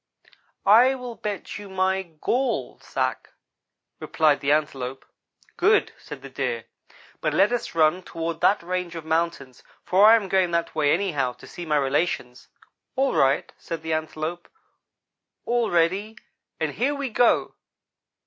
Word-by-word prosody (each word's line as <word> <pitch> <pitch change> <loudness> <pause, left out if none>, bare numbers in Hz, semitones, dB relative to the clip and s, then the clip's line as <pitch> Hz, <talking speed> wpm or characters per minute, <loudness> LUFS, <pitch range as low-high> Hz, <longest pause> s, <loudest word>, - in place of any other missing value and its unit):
"'I 240 +6 +6
will 250 -2 -7
bet 205 -3 -5
you 205 -1 -10
my 190 0 +1
gall 230 - -2
sack,' - - -3 0.7
replied 155 -3 +2
the 140 - 0
Antelope. 135 -4 -1 0.5
"'Good,' 415 +4 +3
said - - -10
the - - -8
Deer, 480 -1 -3 0.6
'but - - 0
let - - +4
us 245 -7 -3
run 160 +3 +3
toward 165 -2 -5
that 200 -3 +3
range 180 -1 -3
of 165 -2 -7
mountains, 160 -5 -2 0.2
for 195 +3 +5
I 225 - +9
am 215 -4 0
going 190 -1 +2
that 170 0 -4
way, 145 -2 +2
anyhow, 145 -11 0
to - - -15
see 175 -1 -8
my 150 -1 +2
relations.' 135 -3 -1 0.5
"'All 270 0 +1
right,' 135 +1 +2
said 165 -2 -6
the 160 0 -2
Antelope. 155 +2 -4 1.0
'All 240 -1 +1
ready, 190 +6 +1 0.4
and - - -1
here 280 +4 0
we 280 -3 -4
go.' 240 +2 +2
175 Hz, 150 wpm, -24 LUFS, 155-215 Hz, 1.0 s, I